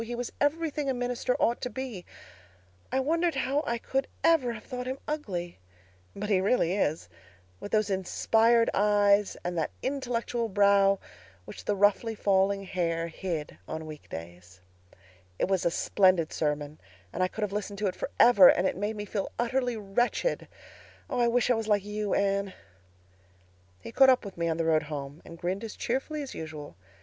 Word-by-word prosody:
He 240 Hz, +1 st, -5 dB
was 245 Hz, 0 st, -4 dB
everything 300 Hz, -1 st, 0 dB
a 265 Hz, -, 0 dB
minister 245 Hz, 0 st, -1 dB
ought 235 Hz, -, +1 dB
to 250 Hz, -, -3 dB
be. 245 Hz, -9 st, -6 dB, 0.8 s
I 265 Hz, -, +1 dB
wondered 330 Hz, +4 st, +1 dB
how 270 Hz, +3 st, 0 dB
I 235 Hz, -, 0 dB
could 265 Hz, +3 st, -2 dB, 0.2 s
ever 320 Hz, -8 st, +3 dB
have 215 Hz, -, -9 dB
thought 250 Hz, -1 st, -6 dB
him 260 Hz, +1 st, -3 dB
ugly—but 170 Hz, -, -7 dB
he 195 Hz, -3 st, +2 dB
really 190 Hz, -4 st, +2 dB
is!—with 90 Hz, -, -5 dB
those 215 Hz, -2 st, +1 dB
inspired 225 Hz, +5 st, +2 dB
eyes 205 Hz, 0 st, +3 dB
and 175 Hz, 0 st, -3 dB
that 155 Hz, -, -1 dB
intellectual 245 Hz, -3 st, -2 dB
brow 200 Hz, 0 st, +4 dB, 0.5 s
which -, -, -10 dB
the 205 Hz, -, +1 dB
roughly 205 Hz, +3 st, +2 dB
falling 195 Hz, -1 st, +2 dB
hair 170 Hz, -3 st, -2 dB
hid 160 Hz, -, -5 dB
on 160 Hz, 0 st, -5 dB
week 155 Hz, -1 st, -10 dB
days. 90 Hz, +3 st, -10 dB, 0.8 s
"It -, -, 0 dB
was 190 Hz, -2 st, 0 dB
a -, -, +4 dB
splendid 185 Hz, -1 st, +2 dB
sermon 150 Hz, -1 st, -2 dB, 0.3 s
and 185 Hz, -, -3 dB
I 185 Hz, -, +3 dB
could 215 Hz, +3 st, -5 dB
have 200 Hz, -1 st, -2 dB
listened 205 Hz, -1 st, -4 dB
to 205 Hz, 0 st, 0 dB
it 185 Hz, -, -2 dB
forever, 205 Hz, -7 st, +6 dB
and 180 Hz, -, +4 dB
it -, -, -2 dB
made 205 Hz, +3 st, -2 dB
me 205 Hz, 0 st, -5 dB
feel 200 Hz, -1 st, -3 dB
utterly 245 Hz, 0 st, 0 dB
wretched. 220 Hz, -, -1 dB, 0.6 s
Oh, 255 Hz, -, -1 dB
I 240 Hz, -, +4 dB
wish 245 Hz, +1 st, +2 dB
I -, -, +6 dB
was 225 Hz, -2 st, -2 dB
like 205 Hz, -2 st, +2 dB
you, 210 Hz, -1 st, -2 dB
Anne. 200 Hz, -1 st, 0 dB, 1.3 s
"He -, -, -8 dB
caught 265 Hz, +2 st, +6 dB
up 255 Hz, -3 st, +3 dB
with 200 Hz, -, -8 dB
me 170 Hz, 0 st, -1 dB
on 160 Hz, -, -1 dB
the 165 Hz, -, 0 dB
road 160 Hz, -1 st, +3 dB
home, 145 Hz, 0 st, -6 dB
and 170 Hz, -, -11 dB
grinned 185 Hz, +5 st, -3 dB
as 225 Hz, -, -6 dB
cheerfully 280 Hz, +5 st, -2 dB
as 275 Hz, -, -8 dB
usual. 155 Hz, -, -8 dB
205 Hz, 180 wpm, -28 LUFS, 170-240 Hz, 1.3 s, forever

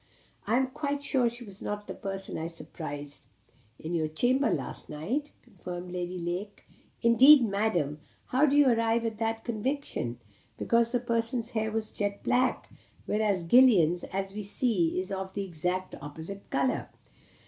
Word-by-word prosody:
"I 225 Hz, +3 st, +3 dB
am 265 Hz, -, +3 dB
quite 285 Hz, +2 st, -3 dB
sure 255 Hz, -4 st, +2 dB
she 240 Hz, +1 st, -8 dB
was 200 Hz, -1 st, -12 dB
not 205 Hz, 0 st, -4 dB
the -, -, -6 dB
person 195 Hz, -1 st, -6 dB
I 160 Hz, -, -3 dB
surprised 145 Hz, -3 st, -7 dB, 0.6 s
in 160 Hz, +2 st, -5 dB
your 160 Hz, -2 st, +1 dB
chamber 245 Hz, -, +2 dB
last -, -, -3 dB
night," 235 Hz, -, -2 dB
continued 180 Hz, -5 st, -8 dB
Lady 180 Hz, 0 st, -3 dB
Lake. 180 Hz, +4 st, -4 dB, 0.4 s
"Indeed, 255 Hz, +3 st, +8 dB
Madam! 195 Hz, -8 st, 0 dB, 0.3 s
How 270 Hz, +4 st, +4 dB
do 285 Hz, +1 st, +3 dB
you 290 Hz, -2 st, +6 dB
arrive 230 Hz, -1 st, +2 dB
at 220 Hz, -1 st, -3 dB
that 225 Hz, 0 st, -1 dB
conviction?" 235 Hz, -, -2 dB, 0.4 s
"Because 235 Hz, 0 st, +2 dB
that 245 Hz, -1 st, -1 dB
person's 230 Hz, 0 st, -1 dB
hair 220 Hz, -1 st, -1 dB
was 220 Hz, 0 st, -2 dB
jet 205 Hz, -1 st, -3 dB
black, 255 Hz, +1 st, +1 dB, 0.4 s
whereas 210 Hz, -4 st, +1 dB
Gillian's, 180 Hz, -5 st, +5 dB
as 195 Hz, +1 st, -4 dB
we 210 Hz, -, -4 dB
see, 200 Hz, -5 st, 0 dB
is 185 Hz, +1 st, -5 dB
of 190 Hz, 0 st, -4 dB
the 200 Hz, -, -1 dB
exactly 180 Hz, +1 st, -3 dB
opposite 160 Hz, +7 st, -8 dB
colour." 260 Hz, -, 0 dB
210 Hz, 160 wpm, -29 LUFS, 180-240 Hz, 0.6 s, Indeed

